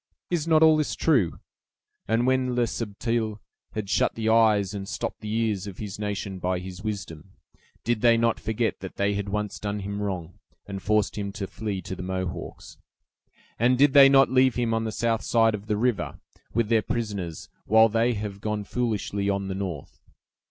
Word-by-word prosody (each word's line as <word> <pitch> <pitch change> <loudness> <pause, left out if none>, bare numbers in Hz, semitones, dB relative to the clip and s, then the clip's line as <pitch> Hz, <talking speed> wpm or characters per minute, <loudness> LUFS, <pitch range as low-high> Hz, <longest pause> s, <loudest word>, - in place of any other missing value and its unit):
Is 165 -3 0
not 160 -1 +5
all 160 -1 +6
this 150 - -1
true? 125 - +2 0.7
And 115 +3 +2
when 130 -1 +1
Le 120 -1 +3
Subtil 110 0 -2 0.4
had 105 -2 -4
shut - - +1
the 110 -1 -1
eyes 110 -4 +4
and 100 -1 -5
stopped - - -4
the 105 -1 -5
ears 110 -3 0
of 95 - -8
his 105 -2 -6
nation 100 -2 -3
by 90 +1 0
his 90 +2 -8
wisdom, 95 -4 -6 0.5
did 120 -2 0
they 115 -1 +5
not 115 0 +1
forget 110 +1 -1
that 95 - -8
they 100 +1 +1
had 100 0 -3
once 105 0 -3
done 105 0 -3
him 100 +1 -4
wrong, 90 -4 -4 0.3
and 100 -1 -6
forced 105 0 +1
him 100 -1 -3
to 100 - -4
flee 100 -2 -5
to 95 - -5
the - - -7
Mohawks? 95 -1 -5 0.8
And 125 +2 +3
did 140 +1 +5
they 140 -1 +9
not 135 -1 +5
leave 130 -1 +4
him 120 -2 0
on 115 0 0
the 110 - -2
south 115 0 0
side 115 -1 +3
of 105 0 -6
the 105 - 0
river, 120 -1 -1 0.3
with 115 -1 0
their 115 -2 +4
prisoners, 105 -9 -4 0.2
while 110 +1 +6
they 115 +2 +1
have 100 -1 -5
gone 105 -1 -2
foolishly 105 -3 -2
on 100 -1 -1
the - - -2
north? 95 -7 -6
105 Hz, 195 wpm, -26 LUFS, 100-115 Hz, 0.8 s, they